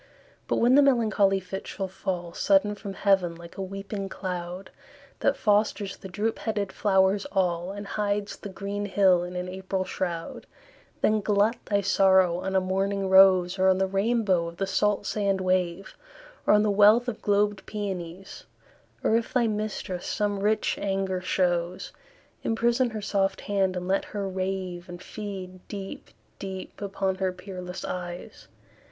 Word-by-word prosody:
But - - +1
when 240 +2 +4
the 285 - +7
melancholy 215 -7 +3
fit 190 +1 -7
shall 195 -1 -4
fall 180 -2 -4
Sudden 200 +1 +3
from 200 -1 -7
heaven 190 -4 +2
like 170 0 -12
a - - -5
weeping 195 +1 -5
cloud, 180 0 -5 0.5
That - - +2
fosters 210 -1 +1
the - - -10
droop 210 +4 -2
headed 205 -3 -2
flowers 195 +2 +2
all, 180 -2 0
And 205 +1 -7
hides 205 0 -2
the 205 - -8
green 200 +1 -4
hill 190 -3 +4
in 180 +1 -6
an 180 0 -3
April 190 +1 -3
shroud; 175 -3 -4 0.5
Then 215 0 +3
glut 210 +3 +2
thy 200 -1 +1
sorrow 190 -2 +4
on 190 +1 -3
a - - +6
morning 195 +1 -1
rose, 190 -1 +6
Or 190 0 +5
on 185 - +4
the 190 - +2
rainbow 195 -3 +1
of 170 0 -9
the 195 - 0
salt 205 +1 +1
sand 200 -2 0
wave, 185 0 -1 0.5
Or - - +7
on 210 - +4
the 210 - +2
wealth 210 +4 +6
of 235 -3 -4
globed 205 -1 +1
peonies; 190 -3 -6 0.6
Or 220 - +3
if 230 +1 0
thy 250 -3 +2
mistress 210 -4 -3
some 205 -2 -1
rich 210 +2 +1
anger 195 -2 -1
shows, 175 -1 0 0.5
Emprison 235 +2 +2
her 215 -1 -5
soft 195 -1 0
hand, 195 -2 0
and 180 0 -4
let 195 +1 +1
her 200 -2 -4
rave, 185 -2 -3
And 175 0 -8
feed 190 -2 -7
deep, 195 -2 -7 0.3
deep 190 0 -7
upon 195 -1 -1
her 190 -1 0
peerless 180 0 -7
eyes. 175 -1 -6
195 Hz, 160 wpm, -26 LUFS, 185-205 Hz, 0.6 s, the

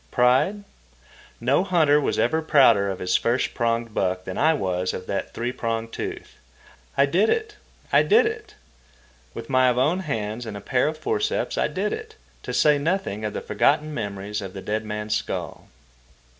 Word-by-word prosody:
Pride? 130 +12 +2 0.8
No 135 +8 +2
hunter 160 -6 +3
was - - -1
ever 160 0 +1
prouder 120 -10 +4
of 95 - -3
his 90 -1 -1
first 120 +2 +1
pronged 115 -1 -1
buck 95 -2 -1
than 95 - -5
I 160 +7 +3
was 90 -4 -1
of 90 - -7
that 100 - -3
three 120 +1 -2
pronged 115 -2 -3
tooth. - - -6 0.6
I 140 - +5
did 185 +10 +2
it! 435 -2 -1 0.4
I - - +7
did 450 +2 +4
it! 445 0 -5 0.8
With - - -7
my 130 -2 +4
own 135 +9 +2
hands 115 - -4
and 105 -2 -5
a - - -7
pair 125 +5 +1
of 155 0 -3
forceps 425 - -1
I - - +1
did - - -2
it, 445 0 -7 0.3
to - - -6
say 150 -1 +3
nothing 160 - -2
of 105 -1 -3
the - - -4
forgotten 150 +1 +1
memories 105 -4 -4
of 95 -2 -7
the 95 - -7
dead 110 +1 -2
man's 105 0 -3
skull. - - -4
125 Hz, 180 wpm, -24 LUFS, 105-160 Hz, 0.8 s, I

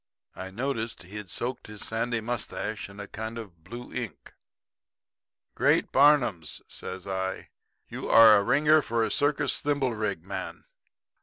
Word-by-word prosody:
I 95 0 -6
noticed 115 +2 -3
he'd 100 +1 -8
soaked 120 +6 -4
his 105 -1 -8
sandy 115 +1 -1
mustache 110 -2 -4
in 100 +1 -12
a 100 - -6
kind 110 +3 -6
of 90 -8 -10
blue 120 +7 -9
ink. 125 -5 -6 1.2
"'Great - - +2
Barnums?' 130 - +3
says 95 0 -6
I. 95 -1 -3 0.4
'You're - - -5 0.3
a - - +3
ringer 150 +7 +4
for 115 -3 0
a - - -1
circus 145 -1 +1
thimblerig 115 - -1
man.' 95 +1 -6
110 Hz, 135 wpm, -27 LUFS, 100-125 Hz, 1.2 s, ringer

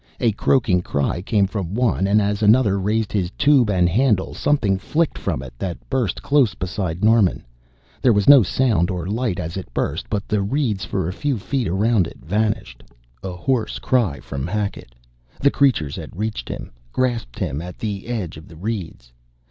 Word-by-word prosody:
A 115 - +3
croaking 105 -4 +2
cry 70 +1 -1
came 100 +1 +2
from 95 -2 -4
one 115 -6 +1
and 105 +2 +4
as 105 0 0
another 105 -2 +4
raised 105 +2 0
his 95 -4 0
tube 140 -6 +4
and 90 -3 +3
handle, 105 +1 +1
something 105 -10 +1
flicked 160 +9 0
from 65 - -3
it 60 - -10
that 90 -3 -3
burst 125 -9 -1
close 140 -5 +3
beside 90 -2 -3
Norman. 110 -4 +3 0.6
There 125 - +5
was 100 -2 +2
no 140 -2 +10
sound 105 -4 +1
or 90 -3 -3
light 110 -1 -1
as 85 +1 -4
it 95 -10 -7
burst, 80 +7 -2
but 105 -2 -2
the 105 -1 +1
reeds 105 -2 -1
for 95 -5 -2
a 90 - -3
few 140 +4 -1
feet 125 +3 -2
around 100 +1 +2
it - - -12
vanished! 105 - -2 0.4
A 95 - -5
hoarse 120 +4 -1
cry 110 - +1
from 70 +1 -5
Hackett 100 - -4 0.4
the 140 - +3
creatures 100 - +1
had 80 +2 -9
reached 110 +1 -3
him, - - -6 0.2
grasped 120 - -1
him 70 +4 -2
at 90 +1 -8
the 105 -2 -4
edge 105 -10 -4
of 80 - -12
the 80 - -13
reeds! 90 - -5
100 Hz, 185 wpm, -21 LUFS, 90-115 Hz, 0.6 s, no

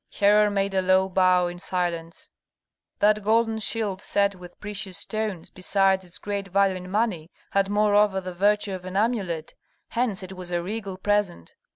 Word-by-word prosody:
Herhor 210 +1 +5
made 200 -1 -1
a 190 - +2
low 185 +1 +3
bow 185 -1 +3
in 175 0 -5
silence. 170 -3 -3 0.7
That 215 +1 +3
golden 225 +1 +2
shield 210 -3 -2
set 200 0 +1
with 180 -2 -13
precious 205 -2 -5
stones, 215 -6 -4
besides 190 0 +2
its 175 -1 -8
great 200 -1 -4
value 195 0 +2
in 180 0 -9
money, 195 -6 -1 0.2
had 195 0 +2
moreover 205 -1 +3
the 185 -1 -6
virtue 205 +2 +2
of 185 -1 -6
an 185 +1 -4
amulet; 200 -8 -1 0.4
hence 225 -5 -1
it 185 +1 -8
was 180 -1 -7
a 175 -1 -1
regal 200 -1 -5
present. 200 - -1
195 Hz, 170 wpm, -25 LUFS, 185-210 Hz, 0.7 s, Herhor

